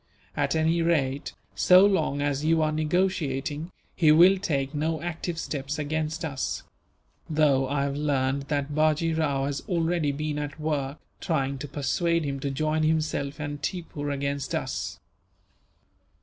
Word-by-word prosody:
At - - 0
any 160 +1 +2
rate, 145 -4 0 0.2
so 185 +2 +6
long 185 -8 +1
as 145 0 -1
you 160 0 +3
are 155 - +1
negotiating, 155 -2 -1 0.2
he 155 -3 +5
will 180 +5 +7
take 140 -7 -1
no 155 +2 -1
active 170 0 -4
steps 145 -2 -3
against 155 +2 -2
us; 140 -4 -3 0.7
though 145 -4 +3
I 140 0 0
have 140 0 -1
learned 140 -1 0
that 145 -1 -1
Bajee 155 +2 +2
Rao 145 -4 0
has 140 0 -2
already 165 -3 +1
been 150 +1 -3
at 145 +1 -5
work, 150 -2 -2 0.2
trying 140 -6 -1
to 145 - -5
persuade 165 +4 0
him 140 -1 -3
to 140 - -2
join 155 +3 0
himself 155 -2 0
and 145 -1 -4
Tippoo 160 -5 -4
against 140 -1 -2
us. - - -3
150 Hz, 150 wpm, -26 LUFS, 140-160 Hz, 0.7 s, will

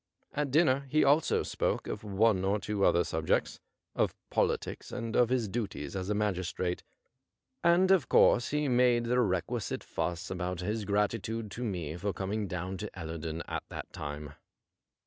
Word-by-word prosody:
At 150 -1 -1
dinner 140 -2 +3
he 155 +3 +4
also 145 +3 +3
spoke - - -1
of - - -5
one 100 -1 +2
or 100 +2 +1
two 105 -1 -2
other 85 - +5
subjects^ - - 0 0.4
of - - +1 0.2
politics - - -1
and 115 -2 -4
of 120 -1 +4
his 125 -4 +1
duties 95 - -4
as 95 0 -3
a 105 - +1
magistrate, 95 -3 -1 0.8
and 175 +2 +5
of 185 -7 +4
course 120 - +5
he 150 0 0
made 125 -2 +4
the 125 +1 +1
requisite 95 -7 -1
fuss 85 0 -3
about 90 0 -3
his 105 +3 -2
gratitude 105 +2 -1
to 125 - -5
nie 85 -8 -3
for 100 +2 -2
coming 100 +2 -2
down 90 +1 -4
to 105 +2 -5
Ellerdon 80 -1 -4
at - - -3
that - - -7
time. 75 0 -6
105 Hz, 165 wpm, -31 LUFS, 90-120 Hz, 0.8 s, other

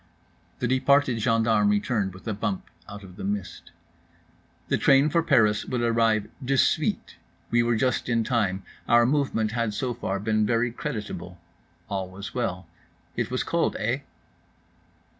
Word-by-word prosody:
The 125 - -1
departed 130 -1 +3
gendarme 110 -2 +2
returned, 105 -2 0
with 95 +2 -13
a 110 - 0
bump, 100 -1 -3 0.2
out 100 0 -9
of 90 -1 -13
the - - -7
mist. 100 -3 -4 1.0
The - - 0
train 140 +2 +4
for 170 - +3
Paris 115 -10 +3
would 125 -2 -2
arrive 115 -2 +2 0.2
de 135 +2 +1
suite. - - +1 0.3
We 120 - +4
were 120 0 +1
just 125 +2 0
in 115 -1 +2
time, 100 -5 0 0.2
our 120 0 +5
movement 130 -5 +1
had 115 -2 -1
so 125 +1 -2
far 100 -4 -3
been 110 +1 +1
very 115 +2 +1
creditable. 105 - -6 0.5
All 95 -2 -3
was 100 +2 -8
well. 95 -7 -2 0.5
It - - -1
was - - -1
cold, - - 0
eh? - - -1
115 Hz, 155 wpm, -26 LUFS, 100-125 Hz, 1.0 s, our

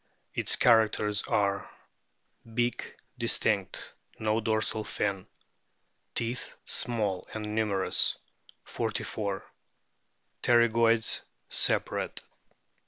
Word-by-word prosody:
Its - - +3
characters 110 -3 +4
are: 100 -1 0 0.8
Beak 120 +1 -2 0.2
distinct; 105 -4 0 0.2
no 110 0 0
dorsal 110 0 0
fin. 100 -3 -2 0.9
Teeth 120 +2 -3
small 105 -6 0
and 105 -1 -4
numerous, 105 -3 +2 0.5
44. 100 -2 -3 1.0
Pterygoids 115 -1 +3 0.3
separate. - - 0
110 Hz, 70 wpm, -29 LUFS, 105-115 Hz, 1.0 s, characters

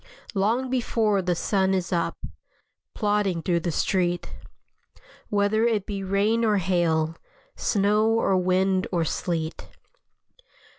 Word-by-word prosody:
Long 225 +6 +1
before 225 -5 +1
the 180 -1 0
sun 190 +1 +1
is 185 0 -2
up, 170 -1 -1 0.8
Plodding 205 -5 0
through 175 -2 +1
the 170 +1 -2
street, 175 +1 -1 1.0
Whether 210 +2 +2
it 215 -4 0
be 200 -2 -4
rain 205 +4 +1
or 215 -2 +3
hail, 165 -3 +1 0.4
Snow 210 +1 +2
or 225 -3 +2
wind 185 +1 +1
or 170 -3 +1
sleet. 160 0 -3
195 Hz, 115 wpm, -25 LUFS, 175-210 Hz, 1.0 s, or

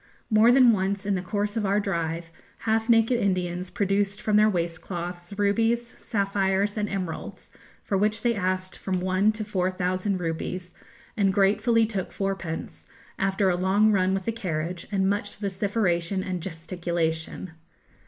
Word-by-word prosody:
More 220 +2 +6
than 250 -2 +7
once 195 -1 -1
in 205 - +1
the 185 - -1
course 205 +3 -2
of 225 - 0
our 200 +1 +2
drive, 170 -4 -2 0.3
half 225 +1 0
naked 230 +1 +4
Indians 180 -2 -1
produced 200 +1 0
from 215 -3 0
their 215 +1 +6
waist 170 -4 -2
cloths 175 +1 -6
rubies, 225 +3 +1
sapphires, 200 -1 0
and 210 -1 -1
emeralds 185 -4 -5 0.3
for 195 - 0
which 215 +2 +1
they 240 -1 +3
asked 185 -2 -2
from 185 -2 -1
one 185 +3 +2
to 215 0 -4
four 185 -3 0
thousand 185 +1 -1
rupees, 175 +1 -4 0.4
and 200 -3 +3
gratefully 215 +4 +3
took 205 -4 -3
fourpence, 190 -4 -4 0.3
after 195 0 +2
a - - +1
long 195 +4 +3
run 190 -1 +2
with 190 -1 -3
the - - 0
carriage, 175 -5 -4
and 190 -1 +1
much 205 +1 -1
vociferation 195 -2 -1
and 185 -2 -3
gesticulation. 165 0 -3
195 Hz, 155 wpm, -26 LUFS, 180-210 Hz, 0.4 s, than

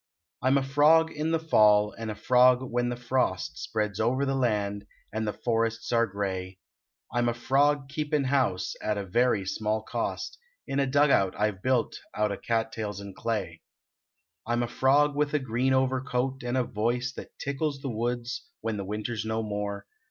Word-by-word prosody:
I - - 0
m 135 +2 +5
a 135 - +1
frog 150 +4 +4
in 155 +1 -2
the 165 - +2
fall 105 -9 +4
and 115 -1 -5
a 105 - -4
frog 125 +2 +4
when 120 -1 -1
the 125 - -2
frost 120 -7 -1
Spreads 105 -2 -2
over 130 +5 +1
the 135 - 0
land, 105 -5 -1 0.3
and 110 0 -2
the - - +1
forests 115 +1 -1
are 115 -1 +3
gray. 95 -2 -4 0.6
I 120 - +1
m 120 0 +2
a 115 - -2
frog 140 +3 +2
keepin 150 0 -1
house 130 -9 +1
at 105 -1 -1
a 100 - -3
very 110 0 +2
small 110 +3 -1
cost 435 - -4 0.3
In 135 - -1
a 135 - +2
dug 145 +2 +4
out 95 -5 +2
I 105 0 +3
ve 95 - -15
built 125 -2 0 0.2
out 105 -1 +1
o 100 - -3
cat 115 -1 -1
tails 105 -3 -4
and 100 -1 -9
clay. 115 -2 -3 0.9
I 120 - 0
m 120 0 +1
a - - -1
frog 140 +4 +3
with 150 0 0
a - - +3
green 130 0 0
overcoat 130 0 0
and 125 +1 -2
a 130 - +3
voice 120 +3 -1
That - - -10
tickles 140 0 -2
the 140 - -3
woods, 120 - -3
when 110 -2 -2
the 100 - -4
winter 105 +3 -3
s 110 - -3
no 110 0 -2
more. 105 -1 -4
120 Hz, 200 wpm, -28 LUFS, 105-135 Hz, 0.9 s, m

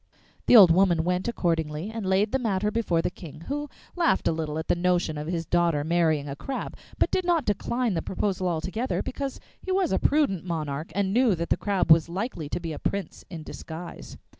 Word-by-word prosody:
The - - +7
old 195 -7 +10
woman 175 -2 +3
went 180 +3 -1
accordingly, 165 -4 -1
and 225 -4 -4
laid 195 +3 +2
the 265 - +1
matter 210 -3 0
before 190 -7 0
the - - -1
King, 155 -4 -11
who 290 - -4 0.3
laughed 230 - +2
a - - +3
little 155 -1 -3
at 160 - -4
the - - +3
notion 175 -2 +1
of 150 +1 -5
his 170 -1 -2
daughter 170 -4 +1
marrying 160 -3 +1
a 140 - -5
crab, 265 - -5 0.2
but - - +1
did 370 - +1
not 345 -5 +1
decline 230 +3 0
the 165 - -1
proposal 190 0 -2
altogether, 185 +9 -2
because 275 0 -4 0.2
he 380 - -4
was 375 -3 +1
a - - +2
prudent 280 - +1
monarch, 155 -3 -4
and 195 -1 0
knew 240 -4 +4
that 170 0 -4
the - - +5
Crab 195 -5 0
was 160 0 +6
likely 180 - -4
to - - -2
be 165 -2 -5
a - - -7
prince 200 -1 -3
in 165 -4 -7
disguise. 165 +3 -9
180 Hz, 215 wpm, -26 LUFS, 165-220 Hz, 0.3 s, old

